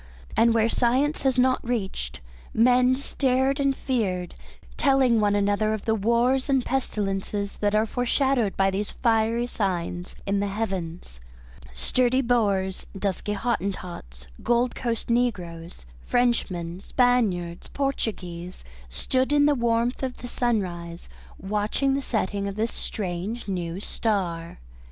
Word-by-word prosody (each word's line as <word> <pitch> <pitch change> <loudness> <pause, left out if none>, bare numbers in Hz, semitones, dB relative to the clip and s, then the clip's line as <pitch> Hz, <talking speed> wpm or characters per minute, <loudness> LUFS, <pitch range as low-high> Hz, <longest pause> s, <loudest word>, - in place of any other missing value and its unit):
And 230 0 +4
where 225 0 +4
science 260 +6 +1
has 265 -2 +1
not 255 0 +3
reached, 190 - -3 0.3
men 250 +2 +5
stared 265 0 +1
and 275 -1 +2
feared, 195 -11 -1 0.4
telling 265 -4 +3
one 205 -1 +2
another 205 +2 +2
of 215 - -8
the 220 - +2
wars 235 +5 +2
and 265 -3 +2
pestilences 200 -5 -2
that 205 0 +1
are 215 +1 +3
foreshadowed 245 -1 +1
by 195 0 +3
these 200 +2 -2
fiery 230 0 +1
signs 180 -5 -3
in 200 0 +1
the 200 - 0
Heavens. 185 - -4 0.6
Sturdy 250 - +2
Boers, 200 -6 +1
dusky 200 +1 -2
Hottentots, 185 - -4 0.2
Gold 240 +1 +2
Coast 235 -2 -2
negroes, 180 - -2 0.2
Frenchmen, 185 -8 0
Spaniards, 200 -8 +1
Portuguese, 185 -10 -3 0.3
stood 255 - 0
in 290 0 +5
the 295 - +5
warmth 235 -1 0
of 260 -2 -3
the 245 - -7
sunrise 180 -9 -2 0.3
watching 210 +7 0
the 275 - 0
setting 205 -5 -1
of 200 - -4
this 225 +2 -1
strange 200 +4 -4
new 175 -2 -3
star. 180 -6 -2
220 Hz, 130 wpm, -25 LUFS, 190-245 Hz, 0.6 s, men